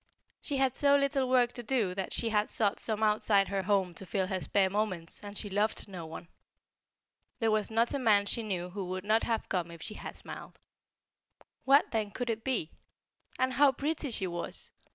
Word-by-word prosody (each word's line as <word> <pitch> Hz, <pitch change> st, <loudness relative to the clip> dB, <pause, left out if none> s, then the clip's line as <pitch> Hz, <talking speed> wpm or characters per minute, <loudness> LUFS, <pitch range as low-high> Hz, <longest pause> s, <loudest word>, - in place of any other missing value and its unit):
She 285 Hz, -, -1 dB
had 265 Hz, -1 st, +2 dB
so 285 Hz, -1 st, +4 dB
little 280 Hz, -2 st, +1 dB
work 245 Hz, -1 st, +3 dB
to 240 Hz, -, -6 dB
do 225 Hz, -6 st, 0 dB
that 190 Hz, 0 st, -4 dB
she 230 Hz, -, 0 dB
had 210 Hz, -1 st, +1 dB
sought 210 Hz, -3 st, +1 dB
some 220 Hz, -1 st, 0 dB
outside 210 Hz, -2 st, +3 dB
her 195 Hz, -1 st, 0 dB
home 190 Hz, -2 st, +1 dB
to 195 Hz, -, -5 dB
fill 190 Hz, 0 st, 0 dB
her 185 Hz, 0 st, -2 dB
spare 195 Hz, +1 st, +2 dB
moments, 190 Hz, -4 st, -2 dB
and 205 Hz, 0 st, -8 dB
she 210 Hz, -, -2 dB
loved 205 Hz, +3 st, -1 dB
no 180 Hz, -5 st, -7 dB
one. 165 Hz, +1 st, -9 dB, 1.1 s
There 225 Hz, -2 st, +1 dB
was 215 Hz, -1 st, +1 dB
not 230 Hz, +3 st, +1 dB
a 280 Hz, -, 0 dB
man 210 Hz, -5 st, +4 dB
she 230 Hz, -, +1 dB
knew 180 Hz, -5 st, -3 dB
who 195 Hz, 0 st, -4 dB
would 185 Hz, +1 st, -4 dB
not 215 Hz, +2 st, +3 dB
have 225 Hz, -2 st, -1 dB
come 175 Hz, -3 st, -1 dB
if 170 Hz, -1 st, -10 dB
she -, -, -5 dB
had -, -, -8 dB
smiled. -, -, -10 dB, 1.1 s
What, 275 Hz, +2 st, +5 dB
then, 215 Hz, -3 st, 0 dB
could 245 Hz, +3 st, -2 dB
it 225 Hz, 0 st, -4 dB
be? 245 Hz, -12 st, -1 dB, 0.7 s
And 260 Hz, 0 st, +1 dB
how 280 Hz, +1 st, +5 dB
pretty 295 Hz, +2 st, -2 dB
she 210 Hz, -5 st, -1 dB
was! 175 Hz, -1 st, -5 dB
210 Hz, 205 wpm, -31 LUFS, 190-245 Hz, 1.1 s, What